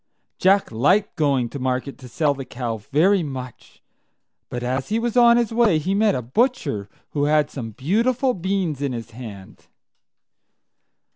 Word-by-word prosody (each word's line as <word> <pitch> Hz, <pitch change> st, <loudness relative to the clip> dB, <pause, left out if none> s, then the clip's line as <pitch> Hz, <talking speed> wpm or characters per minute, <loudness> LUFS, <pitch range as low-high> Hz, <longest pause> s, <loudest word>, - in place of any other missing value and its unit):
Jack 195 Hz, +2 st, +3 dB
liked 180 Hz, -, +2 dB
going 140 Hz, -6 st, +1 dB
to 140 Hz, -, -7 dB
market 130 Hz, +2 st, -2 dB
to 130 Hz, -, -11 dB
sell 145 Hz, +3 st, +1 dB
the 135 Hz, -1 st, -7 dB
cow 120 Hz, -3 st, -4 dB
very 155 Hz, -, +2 dB
much; 130 Hz, -5 st, -8 dB, 0.7 s
but 120 Hz, 0 st, -5 dB
as 130 Hz, +2 st, -2 dB
he 220 Hz, -, +1 dB
was 235 Hz, 0 st, -2 dB
on 235 Hz, -1 st, +6 dB
his 235 Hz, -2 st, 0 dB
way, 225 Hz, -8 st, +4 dB
he 180 Hz, +6 st, -1 dB
met 210 Hz, 0 st, +3 dB
a 125 Hz, -, -3 dB
butcher 140 Hz, -, 0 dB, 0.2 s
who 145 Hz, -1 st, 0 dB
had 150 Hz, 0 st, +2 dB
some 120 Hz, -5 st, -6 dB
beautiful 230 Hz, -, +1 dB
beans 185 Hz, -, -2 dB
in 140 Hz, -3 st, -1 dB
his 115 Hz, -1 st, -7 dB
hand. 110 Hz, -5 st, -11 dB
145 Hz, 160 wpm, -22 LUFS, 125-200 Hz, 0.7 s, on